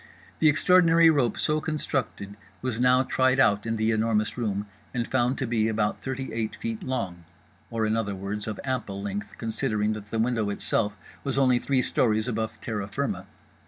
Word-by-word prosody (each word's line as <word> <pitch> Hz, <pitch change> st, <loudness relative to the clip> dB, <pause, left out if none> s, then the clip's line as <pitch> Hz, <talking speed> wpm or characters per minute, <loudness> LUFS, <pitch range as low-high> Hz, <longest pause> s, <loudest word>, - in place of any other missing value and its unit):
The 155 Hz, -, +6 dB
extraordinary 165 Hz, +1 st, +5 dB
rope 130 Hz, -7 st, +1 dB
so 155 Hz, 0 st, +1 dB
constructed 135 Hz, -10 st, -3 dB, 0.3 s
was 125 Hz, -3 st, -2 dB
now 125 Hz, +1 st, +5 dB
tried 130 Hz, 0 st, +2 dB
out 105 Hz, -4 st, +3 dB
in 115 Hz, -, 0 dB
The 110 Hz, +1 st, +2 dB
Enormous 110 Hz, -1 st, +1 dB
Room, 105 Hz, -4 st, -2 dB, 0.3 s
and 120 Hz, -1 st, -1 dB
found 130 Hz, 0 st, +1 dB
to 135 Hz, -, -1 dB
be 115 Hz, -2 st, +1 dB
about 105 Hz, -1 st, 0 dB
thirty 135 Hz, 0 st, -4 dB
eight 110 Hz, -1 st, -2 dB
feet 115 Hz, -1 st, -4 dB
long; 100 Hz, -10 st, -3 dB, 0.5 s
or 115 Hz, -1 st, -1 dB
in 110 Hz, +1 st, +1 dB
other 105 Hz, -3 st, -1 dB
words 100 Hz, +3 st, -4 dB
of 110 Hz, -, -4 dB
ample 125 Hz, -7 st, -3 dB
length, 100 Hz, +1 st, -5 dB
considering 110 Hz, -1 st, -1 dB
that 105 Hz, -1 st, -8 dB
the 115 Hz, -, -2 dB
window 115 Hz, -2 st, +1 dB
itself 105 Hz, +1 st, 0 dB, 0.3 s
was 135 Hz, -2 st, -2 dB
only 130 Hz, -2 st, +4 dB
three 130 Hz, -1 st, +1 dB
stories 110 Hz, -1 st, +1 dB
above 110 Hz, -2 st, -3 dB
terra 105 Hz, -3 st, -3 dB
firma. 100 Hz, -, -3 dB
115 Hz, 180 wpm, -26 LUFS, 105-130 Hz, 0.5 s, The